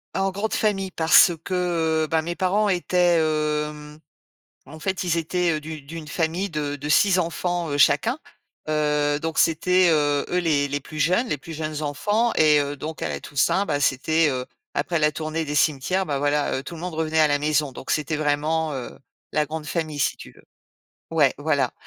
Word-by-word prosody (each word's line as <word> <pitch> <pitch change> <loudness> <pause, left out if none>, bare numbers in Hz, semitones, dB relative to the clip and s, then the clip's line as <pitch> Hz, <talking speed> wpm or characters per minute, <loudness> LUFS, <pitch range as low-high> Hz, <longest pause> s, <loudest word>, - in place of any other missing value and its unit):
En 195 0 +1
grande 205 +3 -3
famille 195 -3 0
parce 165 +1 +6
que, 170 -4 0
heu, - - -8
ben, 160 0 +1
mes 170 +2 -4
parents 205 +3 +1
étaient, 175 -1 +2
hem, 150 -1 -2 0.7
en 155 +3 -12
fait, 190 +3 -2
ils 170 -1 0
étaient, 175 +1 0
heu, 155 - -3
d'u 155 0 -8
d'une 155 +2 -9
famille 170 +5 -1
de 145 -3 -3
de 145 +1 -6
6 185 +4 +4
enfants, 175 0 -2
heu, 145 - -1
chacun. 145 - +3 0.5
Heu, 150 -1 +1
donc 160 +1 -4
c'était, 180 +3 +3
heu, 145 -2 +1
eux 180 - 0
les 150 -5 +1
les 145 +1 -2
plus 155 +3 -9
jeunes 180 - +2
les 150 - -1
plus 165 +4 -11
jeunes 155 -1 -4
enfants 205 - 0
et 150 -1 +5
heu, 145 0 -4
donc 155 +3 -7
à 80 - -2
la 70 - -4
Toussaint, 165 - 0
bah, 145 -5 -1
c'était, 155 +4 +2
heu, 130 -1 -3 0.3
après 170 +4 0
la 150 -1 +2
tournée 155 +2 -3
des 150 -1 -4
cimetières, 155 +6 +1
bah, 145 -4 -2
voilà, 145 +1 0
heu, 130 - -4
tout 170 - -8
le 165 - -9
monde 180 -2 -5
revenait 160 0 0
à 155 - +6
la 145 0 +2
maison. 150 -2 0
Donc - - -6
c'était 155 0 0
vraiment, 155 +1 0
heu, 130 -2 -7 0.4
la 150 0 +2
grande 155 +1 -6
famille, 155 0 -3
si - - +1
tu - - -12
veux. - - -21 0.7
Ouais, 150 -5 +3
voilà 145 -4 0
155 Hz, 205 wpm, -23 LUFS, 145-175 Hz, 0.7 s, parce